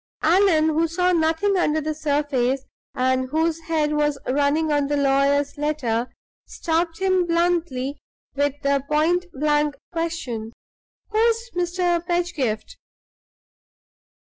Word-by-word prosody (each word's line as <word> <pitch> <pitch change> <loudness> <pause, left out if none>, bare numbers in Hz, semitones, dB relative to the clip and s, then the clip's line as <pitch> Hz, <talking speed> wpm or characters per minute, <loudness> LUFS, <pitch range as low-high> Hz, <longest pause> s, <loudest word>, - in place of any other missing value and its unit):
Allan, 330 -2 +4
who 320 +2 +1
saw 360 +2 +1
nothing 335 +4 +1
under 315 -3 +1
the 310 0 -2
surface, 285 -4 0 0.3
and 260 0 +1
whose 320 +2 0
head 305 -2 +1
was 295 -1 +1
running 290 +4 +1
on 290 -1 +1
the 290 0 0
lawyer's 280 +1 +2
letter, 255 -6 -1 0.4
stopped 330 0 -1
him 375 -2 +1
bluntly 335 -6 0 0.3
with 285 0 0
the 280 -1 +1
point 335 +4 +2
blank 295 +1 +1 0.2
question: 325 -10 -4 0.6
"Who's 460 +2 +1
Mr. 350 -1 0
Pedgift?" 340 -11 -2
310 Hz, 115 wpm, -23 LUFS, 280-345 Hz, 0.6 s, Allan